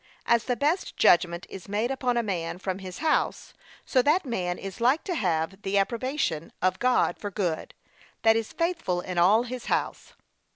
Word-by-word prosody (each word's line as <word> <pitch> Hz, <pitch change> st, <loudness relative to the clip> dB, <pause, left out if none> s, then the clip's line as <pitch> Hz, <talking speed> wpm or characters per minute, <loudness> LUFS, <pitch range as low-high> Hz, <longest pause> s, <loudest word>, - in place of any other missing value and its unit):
As 235 Hz, -1 st, +3 dB
the 250 Hz, -, 0 dB
best 300 Hz, +8 st, -1 dB
judgment 170 Hz, 0 st, +4 dB
is 195 Hz, 0 st, -10 dB
made 215 Hz, +5 st, 0 dB
upon 250 Hz, -2 st, 0 dB
a 235 Hz, -, +2 dB
man 175 Hz, -5 st, -3 dB
from 190 Hz, 0 st, -4 dB
his 185 Hz, -2 st, -8 dB
house, 310 Hz, -, 0 dB, 0.3 s
so 255 Hz, -, +3 dB
that 300 Hz, +7 st, +2 dB
man 180 Hz, -8 st, -2 dB
is 195 Hz, +3 st, -8 dB
like 260 Hz, +7 st, +3 dB
to 370 Hz, -, -3 dB
have 180 Hz, -, -1 dB
the 195 Hz, 0 st, 0 dB
approbation 230 Hz, -, -1 dB
of 185 Hz, 0 st, +1 dB
God 250 Hz, 0 st, +2 dB
for 205 Hz, -, -4 dB
good, 180 Hz, -5 st, -3 dB, 0.5 s
that 225 Hz, 0 st, +6 dB
is 225 Hz, -1 st, -2 dB
faithful 335 Hz, -, -1 dB
in 180 Hz, -1 st, -3 dB
all 205 Hz, +7 st, +5 dB
his 250 Hz, 0 st, -6 dB
house. -, -, -2 dB
210 Hz, 180 wpm, -27 LUFS, 180-255 Hz, 0.5 s, that